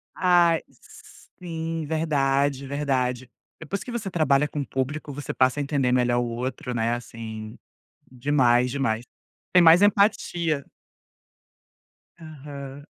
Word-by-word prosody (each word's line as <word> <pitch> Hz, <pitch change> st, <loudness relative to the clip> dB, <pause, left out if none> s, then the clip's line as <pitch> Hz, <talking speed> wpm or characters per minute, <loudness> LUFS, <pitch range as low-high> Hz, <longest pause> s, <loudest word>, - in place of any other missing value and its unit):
Ai, 175 Hz, -2 st, +4 dB, 0.8 s
sim, 165 Hz, -2 st, -4 dB
verdade, 140 Hz, -3 st, 0 dB
verdade. 130 Hz, -3 st, -1 dB, 0.3 s
Depois 180 Hz, +6 st, -5 dB
que 245 Hz, -, -8 dB
você 220 Hz, -5 st, -4 dB
trabalha 150 Hz, -4 st, +2 dB
com 145 Hz, -1 st, -4 dB
público, 145 Hz, +3 st, -4 dB
você 145 Hz, +1 st, -5 dB
passa 130 Hz, +2 st, +2 dB
a -, -, 0 dB
entender 140 Hz, -3 st, 0 dB
melhor 120 Hz, -1 st, +2 dB
o 120 Hz, -, 0 dB
outro, 125 Hz, +1 st, -4 dB
né, 115 Hz, 0 st, 0 dB
assim, 110 Hz, -2 st, -8 dB, 0.5 s
demais, 125 Hz, -2 st, +2 dB
demais. 120 Hz, -4 st, -1 dB, 0.5 s
Tem 180 Hz, -1 st, +6 dB
mais 170 Hz, +3 st, +7 dB
empatia. 175 Hz, -7 st, +2 dB, 1.6 s
Aham. 145 Hz, -3 st, -9 dB
140 Hz, 115 wpm, -25 LUFS, 125-160 Hz, 1.6 s, mais